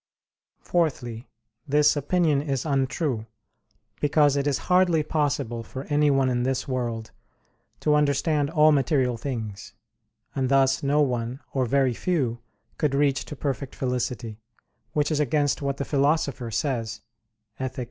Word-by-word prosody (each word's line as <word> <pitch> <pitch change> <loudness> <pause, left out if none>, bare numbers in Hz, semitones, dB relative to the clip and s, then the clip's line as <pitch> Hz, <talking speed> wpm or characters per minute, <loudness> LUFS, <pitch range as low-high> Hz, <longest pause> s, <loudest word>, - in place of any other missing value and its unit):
Fourthly, 130 -9 -1 0.4
this 150 +1 +4
opinion 150 0 +1
is 140 -2 -2
untrue, 135 -4 -1 0.7
because 145 -1 +3
it 140 0 0
is 140 - +1
hardly 180 -3 +3
possible 140 -7 -1
for 130 +4 -7
anyone 145 -2 +3
in 125 -1 0
this 130 +1 -1
world 120 -4 -3 0.7
to 150 - +2
understand 150 0 +2
all 155 -1 +5
material 135 -4 +2
things: 110 -5 -5 0.6
and 130 -2 -1
thus 135 -1 +3
no 145 +2 +2
one, 125 -1 -2
or 130 -2 +1
very 135 0 +2
few, 130 -6 -1 0.4
could 145 -3 +1
reach 140 -2 +1
to 150 - -7
perfect 140 -1 -4
felicity; 125 -3 -3 0.5
which 150 +1 +1
is 150 - +1
against 145 0 +1
what 140 -1 -2
the 140 - -3
Philosopher 140 -4 0
says 115 -1 -2 0.6
(Ethic. 130 0 -4
140 Hz, 135 wpm, -25 LUFS, 125-150 Hz, 0.7 s, all